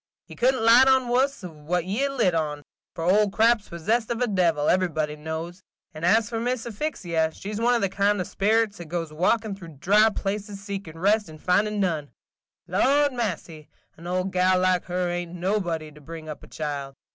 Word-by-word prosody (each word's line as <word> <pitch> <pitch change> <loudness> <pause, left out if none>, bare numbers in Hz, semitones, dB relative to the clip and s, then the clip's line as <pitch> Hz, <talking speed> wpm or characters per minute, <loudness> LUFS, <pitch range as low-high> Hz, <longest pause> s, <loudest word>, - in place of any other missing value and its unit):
Ye - - -12
could 260 +2 +3
n't 225 - -3
light 240 +4 +7
on 260 -2 +3
wus 265 +2 +1
than 155 -5 -11 0.2
ye 200 +5 -2
have 275 0 0
lit 225 -9 +2
on, 150 -3 -2
– - - -70
for 165 - -4
Old 200 +3 +3
Crab's 225 0 +2
possessed 215 +8 -1
of 235 -1 -2
a 250 - +2
devil, 175 -8 +1
everybody 155 -5 +1
knows; 160 +4 -6 0.3
and 155 - -9
as 215 +5 +4
for 230 -1 -3
Miss 245 0 -2
Asphyxia, 185 - -2
she 205 +2 -7
's 210 - -3
one 240 +1 +3
of 235 - 0
the 195 - +2
kind 200 +1 +1
of 180 - -1
sperits 215 +1 +1
that 175 - -7
goes 165 -1 -4
walkin' 210 +6 +1
through 165 -6 -12
dry 210 +8 +4
places 205 -1 -4
seekin' 195 -5 -7
rest 205 +2 +2
and 155 0 -12
findin' 205 +5 +1
none. 160 -7 -1 0.6
Lordy 285 +1 +2
massy, 170 -9 -4 0.3
an 170 +2 -11
old 185 +1 -1
gal 185 0 +3
like 185 -1 +2
her 180 0 -1
ain't 175 0 -4
nobody 175 -4 -2
to 150 0 -16
bring 160 +2 -9
up 155 - -7
a - - -13
child. 140 -3 -5
185 Hz, 205 wpm, -25 LUFS, 165-220 Hz, 0.6 s, light